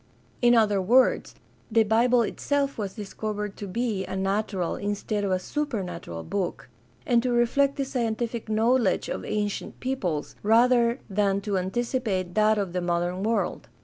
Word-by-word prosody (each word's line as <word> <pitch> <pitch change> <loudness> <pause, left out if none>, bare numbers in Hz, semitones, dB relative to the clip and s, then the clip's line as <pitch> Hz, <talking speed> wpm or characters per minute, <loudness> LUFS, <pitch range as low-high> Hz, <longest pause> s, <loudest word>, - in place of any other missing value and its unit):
In 240 0 +5
other 210 -4 +3
words, 245 +8 +3 0.4
the 225 0 +5
Bible 235 +3 +3
itself 280 +5 -1
was 200 -3 -4
discovered 210 -1 -4
to 205 - -6
be 220 -1 -1
a 190 - -4
natural 195 -1 -1
instead 205 +1 -2
of 200 - 0
a 185 - +2
supernatural 185 - -4
book, 190 -8 -3 0.4
and 235 -1 +3
to 250 - -1
reflect 255 +4 +2
the 275 - -1
scientific 235 -3 -2
knowledge 225 0 +2
of - - -4
ancient 210 -1 -3
peoples 185 - -2
rather 235 +2 +4
than 200 -1 +1
to 200 0 -2
anticipate 190 -1 -1
that 215 0 +3
of 195 -4 -2
the 180 - -1
modern 175 +1 -1
world. 225 +3 -1
215 Hz, 150 wpm, -26 LUFS, 190-240 Hz, 0.4 s, In